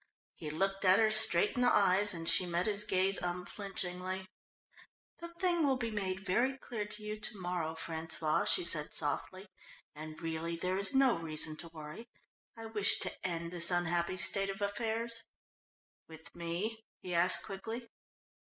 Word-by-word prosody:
He 155 - -7
looked 195 +5 -1
at 185 0 +6
her 220 -1 +4
straight 215 -3 +5
in 250 - 0
the 245 - +5
eyes 200 +1 +4
and 165 -1 -6
she 180 - +5
met 175 +1 0
his 210 -1 +1
gaze 190 +1 +2
unflinchingly. 185 +1 -4 0.9
"The 340 - -6
thing 345 -1 0
will 265 -2 +2
be 235 -2 -2
made 190 -3 -2
very 245 +8 +1
clear 220 -5 -5
to 210 +1 -7
you 210 0 -4
to 215 -1 -5
morrow, 175 -3 -2
François," 160 -1 -1
she - - +4
said 155 -3 0
softly, 185 +6 -3 0.5
"and 155 +1 -8
really 165 0 -3
there 185 +3 -1
is 200 +7 +2
no 265 -2 +5
reason 155 -1 -3
to 170 - -7
worry. 155 +8 -9 0.5
I 225 - -7
wish 210 -2 +1
to - - -2
end 170 -1 -3
this 170 -1 +4
unhappy 175 0 0
state 195 +2 +1
of 195 +2 -4
affairs." 230 +2 -2 0.9
"With 160 0 -13
me?" 180 +7 -3 0.2
he 180 - -4
asked 175 +2 +3
quickly. 225 +4 -6
185 Hz, 165 wpm, -33 LUFS, 170-215 Hz, 0.9 s, at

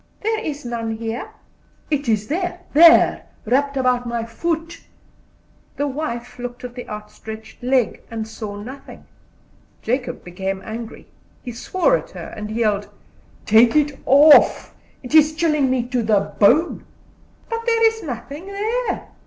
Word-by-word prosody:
"There 440 +1 0
is 295 - -5
none 230 -2 -3
here." 230 - -5 0.6
"It 285 -4 0
is 215 -1 +1
there 355 +2 -3
there, 330 +3 +6 0.2
wrapped 275 +4 +1
about 250 -2 +1
my 235 -1 -2
foot." 330 +7 -3 1.0
The 285 - 0
wife 260 -4 -5
looked 245 0 -7
at 250 -1 -7
the 245 0 -9
outstretched 220 +1 -9
leg, 250 -1 +1
and 225 -1 -5
saw 215 -2 -7
nothing. 250 +7 -10 0.8
Jacob 250 +2 -2
became 190 +2 -4
angry, 225 +1 -7 0.4
he 245 - -6
swore 365 - +1
at - - -10
her, - - -9
and 210 0 -6
yelled: 215 -2 0 0.6
"Take 225 +3 +5
it 295 -2 +1
off; 290 +3 +6 0.3
it 250 - -8
is 310 0 +6
chilling 300 -4 +2
me 255 -1 +1
to 250 -2 0
the 210 -3 +1
bone." 290 +12 +3 0.8
"There 460 -1 +4
is 445 0 -2
nothing 285 - -7
there." 440 +5 -2
250 Hz, 140 wpm, -21 LUFS, 225-310 Hz, 1.0 s, there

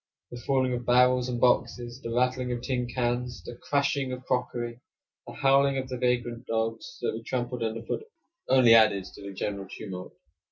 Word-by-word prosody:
The 120 0 -7
falling 130 -1 +1
of 120 0 -3
barrels 125 +1 +4
and 120 -1 -2
boxes, 120 0 +1
the 115 - -5
rattling 125 +1 +1
of 120 0 -3
tin 125 -2 -1
cans, 120 -4 -2
the 120 - -8
crashing 140 0 0
of 125 0 -6
crockery, 120 -2 -2 0.5
the - - -8
howling 135 0 +3
of 130 -1 -3
the 130 - -3
vagrant 120 -1 -1
dogs 115 0 -2
that - - 0
were 110 - -5
trampled 125 0 -3
under 115 0 -2
foot, 435 - -4 0.4
only 130 -3 +7
added 110 -4 +5
to - - -12
the 100 0 -7
general 100 0 -4
tumult. 95 -4 -7
120 Hz, 185 wpm, -28 LUFS, 115-125 Hz, 0.5 s, only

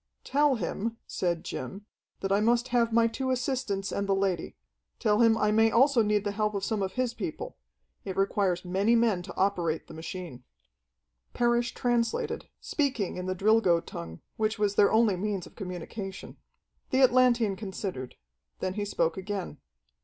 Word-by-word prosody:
"Tell 290 -1 +3
him," 225 +2 -3
said 170 -2 -2
Jim, 195 +11 -6 0.4
"that 195 - -2
I 200 - +4
must 235 +3 +2
have 235 -2 +2
my 230 0 +4
two 250 +3 -2
assistants 250 -6 -1
and 200 0 -2
the 195 - +4
lady. 195 -2 -1 0.4
Tell 210 -2 +2
him 225 -1 +5
I 210 -1 +2
may 225 +1 +5
also 255 +2 +4
need 210 -1 +2
the 205 - -1
help 210 0 -1
of 195 - -2
some 220 -3 -1
of 190 -1 -2
his 250 -2 -1
people. 180 -7 -5 0.5
It 190 -2 -5
requires 195 -2 +1
many 195 +6 +2
men 225 -6 +2
to 180 0 -9
operate 175 -5 0
the - - -12
machine." 160 -5 -7 0.9
Parrish 240 0 +1
translated, 240 -2 -1
speaking 265 - -1
in 180 0 -4
the 185 - -1
Drilgo 195 -3 +4
tongue, 85 -1 -8 0.2
which 220 0 0
was 205 -1 +1
their 205 0 +4
only 220 -3 +4
means 195 -1 -2
of - - -15
communication. 190 +1 -7 0.5
The 260 - +2
Atlantean 240 -5 +4
considered. 190 - -5 0.4
Then 185 0 -2
he 205 +1 -2
spoke 165 -4 0
again. 190 -5 -4
205 Hz, 170 wpm, -28 LUFS, 185-230 Hz, 0.9 s, him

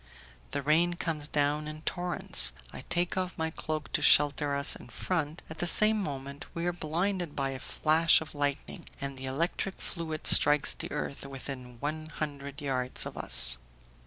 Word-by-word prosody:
The 140 +1 -4
rain 165 +4 +2
comes 155 -4 -4
down 150 +1 -1
in 155 0 -9
torrents, 170 - +3 0.2
I - - -8
take 175 +1 0
off 185 -1 -3
my 160 0 -2
cloak 155 -2 -5
to - - 0
shelter 145 -1 +4
us 140 0 +4
in - - -13
front, 160 +1 -3
at 160 - -10
the 175 - 0
same 215 +4 +4
moment 140 -4 -6
we 170 0 -3
are 175 - 0
blinded 175 +1 -3
by 135 -1 -2
a 130 - -7
flash 160 +5 +3
of 160 - -9
lightning, 145 -1 -3
and 140 -1 -5
the 130 0 -7
electric 170 +7 -3
fluid 160 -2 -6
strikes 150 0 +6
the - - -8
earth 140 - -5
within 130 -3 -8
one 155 +2 -4
hundred 145 -2 -7
yards 130 -2 -1
of - - -7
us. - - +6
150 Hz, 175 wpm, -29 LUFS, 140-165 Hz, 0.2 s, strikes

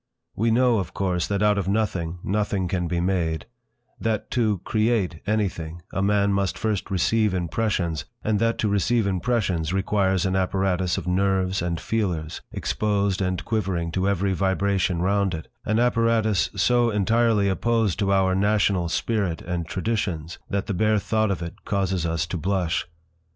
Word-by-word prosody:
We 115 +3 +1
know, 120 -1 +3
of 95 - -5
course, 90 -3 0
that 100 0 0
out 105 -1 +3
of 95 - -3
nothing 95 -5 -1
nothing 100 -2 0
can 90 -1 -1
be 85 0 -1
made, 85 -3 0 0.5
that 110 -2 -2
to 110 -5 +1
"create" 110 -7 0
anything 85 -6 -2
a 95 - -1
man 100 0 +2
must 100 -1 0
first 110 -4 -2
receive 105 +2 +2
impressions, 85 -3 -1 0.2
and 105 -2 +1
that 115 +1 +1
to 110 - 0
receive 105 +3 +2
impressions 95 -4 0
requires 95 -1 +1
an 95 0 0
apparatus 95 -1 0
of - - -4
nerves 95 0 +1
and 85 -1 -2
feelers, 90 -9 -2
exposed 100 -2 0
and 90 -1 -1
quivering 95 -7 -1
to 95 +3 0
every 100 0 +1
vibration 95 -1 +1
round 100 -1 +1
it, 80 - -8 0.2
an 110 +1 +1
apparatus 115 -3 +2
so 120 +4 +3
entirely 110 0 +2
opposed 110 0 +1
to 100 -2 +1
our 95 -1 +3
national 100 -3 +2
spirit 100 -3 -1
and 85 -1 -3
traditions 90 -5 -2
that 100 0 -1
the 105 - -2
bare 110 +3 +2
thought 110 +2 +1
of 95 -3 -2
it 85 - -8
causes 95 -4 -1
us 80 -1 0
to 85 - -4
blush. 90 0 -1
95 Hz, 160 wpm, -24 LUFS, 90-105 Hz, 0.5 s, know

